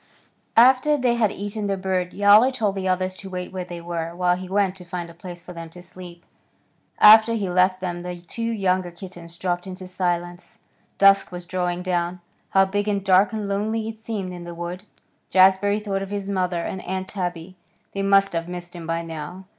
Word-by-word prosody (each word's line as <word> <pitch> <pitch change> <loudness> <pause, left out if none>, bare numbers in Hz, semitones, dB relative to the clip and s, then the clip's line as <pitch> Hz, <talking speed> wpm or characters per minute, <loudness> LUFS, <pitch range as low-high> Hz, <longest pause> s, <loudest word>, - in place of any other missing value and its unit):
After 260 +5 +6
they 250 -3 +2
had 230 -4 +2
eaten 205 +1 -4
the 195 -1 -1
bird 185 -1 -1
Yowler 205 +5 +6
told 220 -6 -1
the 190 -1 -3
others 185 0 0
to 195 - -9
wait 180 -1 -5
where 185 -1 -3
they 175 -1 -7
were, 170 -1 -4
while 180 0 +2
he 185 0 -8
went 195 -1 +2
on - - -20
to 180 - -10
find 175 -1 -6
a - - -15
place 175 0 -10
for 180 - -10
them 165 -1 -8
to 180 +2 -13
sleep. 175 -1 -12 0.7
After 220 +2 +8
he 200 -5 -2
left 185 +1 +2
them 175 -1 -3
the 180 0 -5
two 205 +7 -6
younger 185 -4 0
kittens 175 -1 -11
dropped 175 0 -2
into 185 0 -7
silence. 175 -1 -3 0.4
Dusk 195 -1 +5
was 180 0 -7
drawing 180 0 -2
down. 180 -1 -1 0.3
How 195 0 +4
big 205 +2 -2
and 200 -2 -1
dark 190 +2 +5
and 215 -2 -3
lonely 215 +3 -1
it 220 -1 -7
seemed 205 -5 -5
in 175 -1 -8
the 175 0 -8
wood. 175 +2 -5 0.5
Jazbury 190 +2 +4
thought 200 -2 -3
of 195 - -5
his 200 -1 -4
mother 180 -3 -1
and 190 - -4
Aunt 190 +1 -4
Tabby. 180 -2 -5 0.4
They 195 - -2
must 195 -1 +3
have 165 +1 -3
missed 175 0 -7
him 170 -2 -8
by 165 0 -1
now. 165 +3 -7
185 Hz, 210 wpm, -23 LUFS, 175-200 Hz, 0.7 s, After